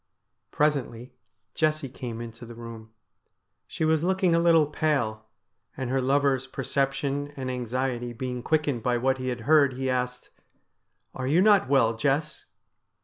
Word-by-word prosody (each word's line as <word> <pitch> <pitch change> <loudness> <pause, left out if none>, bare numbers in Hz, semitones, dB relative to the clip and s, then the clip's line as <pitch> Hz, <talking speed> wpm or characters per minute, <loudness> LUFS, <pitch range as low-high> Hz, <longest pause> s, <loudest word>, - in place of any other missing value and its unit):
Presently 135 -5 -1 0.4
Jessie 155 -2 0
came 120 -2 -7
into 115 0 -9
the 120 0 -10
room. 115 -1 -9 0.8
She 160 - -2
was 160 0 +2
looking 185 -1 +2
a 165 - +4
little 165 -2 +5
pale, 130 -8 -1 0.5
and 130 -1 -3
her 135 0 +1
lover's 135 0 +1
perception 140 +2 -2
and 130 -1 -3
anxiety 125 0 -2
being 125 +1 -4
quickened 150 -3 0
by 120 +1 +1
what 130 +2 0
he 130 - -4
had 125 -2 -3
heard, 145 0 +4
he 130 +1 -2
asked: 125 0 -3 0.4
' - - -50
Are 130 -1 -4
you 155 +6 +3
not 200 -6 +4
well, 115 -5 +3
Jess 145 +4 -1
130 Hz, 150 wpm, -26 LUFS, 120-150 Hz, 0.8 s, little